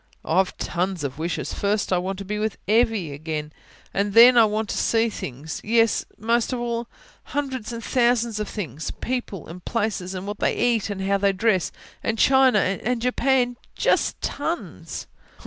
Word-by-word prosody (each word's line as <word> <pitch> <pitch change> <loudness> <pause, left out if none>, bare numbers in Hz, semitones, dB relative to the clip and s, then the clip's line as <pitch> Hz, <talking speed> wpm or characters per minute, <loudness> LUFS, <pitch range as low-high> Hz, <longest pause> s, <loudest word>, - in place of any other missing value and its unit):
"Wish?... - - -33
oh, 165 - +1
I've 190 - 0
tons 180 -1 -2
of 140 +1 -4
wishes. 160 -4 -2
First 205 -1 0
I 180 - +3
want 190 +2 -3
to 195 - -7
be 210 +2 -3
with 215 -2 -1
Evvy 215 -7 +2
again. 150 +1 -5 0.4
And 200 0 0
then, 240 +2 +9
I 230 -2 +7
want 215 +1 -1
to - - -2
see 230 0 +2
things 145 - -6
yes, 225 0 +2
that - - -31
most 230 +3 +1
of 250 - -2
all. 235 -1 -2 0.4
Hundreds 260 -5 -3
and 230 -1 -6
thousands 235 -3 +2
of 210 - -3
things. 160 - -5
People, 245 -8 -3
and 175 +2 -10
places, 205 -5 -2
and 185 +1 -5
what 205 0 -5
they - - +1
eat, 235 -3 +1
and 195 -2 -3
how 200 +1 +1
they 200 0 +3
dress, 190 -2 +1 0.3
and 225 - -1
China, 265 -1 +5 0.3
and 245 +1 0
Japan... 250 0 +1 0.2
just - - +1
tons." 325 +4 -4
210 Hz, 185 wpm, -24 LUFS, 185-235 Hz, 0.4 s, then